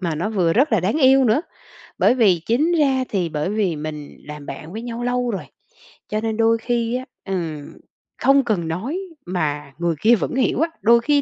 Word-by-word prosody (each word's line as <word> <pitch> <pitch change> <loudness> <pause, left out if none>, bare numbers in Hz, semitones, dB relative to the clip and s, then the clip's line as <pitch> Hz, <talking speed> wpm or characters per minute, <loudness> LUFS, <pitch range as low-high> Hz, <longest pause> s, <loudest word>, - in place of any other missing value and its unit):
mà 170 -4 -1
nó 175 +8 -2
vừa 180 -6 +1
rất 260 - +2
là 220 - +4
đáng 205 - 0
yêu 265 -2 +5
nữa, 225 +5 +3 0.6
bởi - - +4
vì 200 -8 +4
chính 285 +9 +2
ra 270 -3 +2
thì 180 -5 -1
bởi 150 +3 -2
vì 205 -5 0
mình 150 -1 -7
làm 150 -1 -9
bạn 160 +4 -8
với 220 - -5
nhau 240 0 -5
lâu 245 0 0
rồi, 195 - -4 0.6
cho 215 0 -1
nên 220 -1 -2
đôi 225 0 +3
khi 235 0 -1
á, 255 +1 -3 0.2
ừm, 165 -6 -4 0.5
không 275 0 +5
cần 195 -9 -1
nói 225 - -3 0.3
mà 150 -6 -2
người 170 -1 0
kia 230 +2 +6
vẫn 230 - -3
hiểu 260 -1 +1
á, 330 - +2
đôi 235 +2 +5
khi 290 +3 +2
220 Hz, 210 wpm, -21 LUFS, 170-245 Hz, 0.6 s, kia